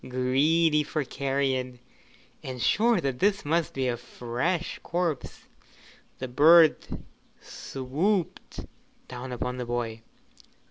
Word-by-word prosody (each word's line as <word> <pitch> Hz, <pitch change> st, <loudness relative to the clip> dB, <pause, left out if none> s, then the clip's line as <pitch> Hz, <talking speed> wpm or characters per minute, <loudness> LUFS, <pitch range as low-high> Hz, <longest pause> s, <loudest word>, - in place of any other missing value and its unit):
Greedy 150 Hz, +5 st, +2 dB
for 150 Hz, 0 st, -2 dB
carrion, 135 Hz, -2 st, -2 dB, 0.6 s
and 130 Hz, -1 st, -7 dB
sure 230 Hz, -, +3 dB
that 135 Hz, -2 st, -2 dB
this 200 Hz, -3 st, +1 dB
must 165 Hz, +2 st, 0 dB
be 135 Hz, -1 st, 0 dB
a 120 Hz, -, 0 dB
fresh 125 Hz, +9 st, -3 dB
corpse, 170 Hz, -5 st, -3 dB, 0.8 s
the 130 Hz, -, -5 dB
bird 155 Hz, +5 st, +6 dB, 0.6 s
swooped 155 Hz, +8 st, -3 dB, 0.5 s
down 125 Hz, +1 st, -7 dB
upon 125 Hz, +1 st, -3 dB
the 125 Hz, -, -4 dB
boy. 115 Hz, -2 st, -3 dB
135 Hz, 105 wpm, -27 LUFS, 125-165 Hz, 0.8 s, bird